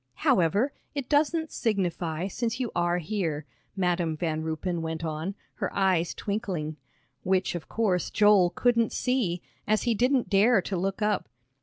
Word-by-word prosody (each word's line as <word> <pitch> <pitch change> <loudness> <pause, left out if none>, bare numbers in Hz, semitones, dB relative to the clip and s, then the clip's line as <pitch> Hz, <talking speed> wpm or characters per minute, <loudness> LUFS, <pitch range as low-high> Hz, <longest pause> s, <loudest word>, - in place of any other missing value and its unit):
"However, 200 - +3 0.2
it 280 -3 -3
doesn't 315 +2 +2
signify, 180 -6 -1
since 230 +4 -2
you 245 -4 -2
are 175 0 +2
here," 165 -5 -2 0.3
Madam 175 -4 0
Van 160 -1 -1
Ruypen 160 +2 -2
went 160 0 -3
on, 160 +5 -3 0.2
her - - -2
eyes 185 -4 +2
twinkling, 185 -8 -3 0.4
which, 185 0 +1
of 175 -2 -6
course, 195 -6 0
Joel 205 -4 +5
couldn't 235 +3 +2
see, 230 -9 0 0.2
as 215 0 +2
he 240 - +2
didn't 250 +3 +2
dare 210 +3 +5
to 190 +1 -3
look 195 +3 -1
up. 210 - 0
190 Hz, 150 wpm, -27 LUFS, 170-225 Hz, 0.4 s, Joel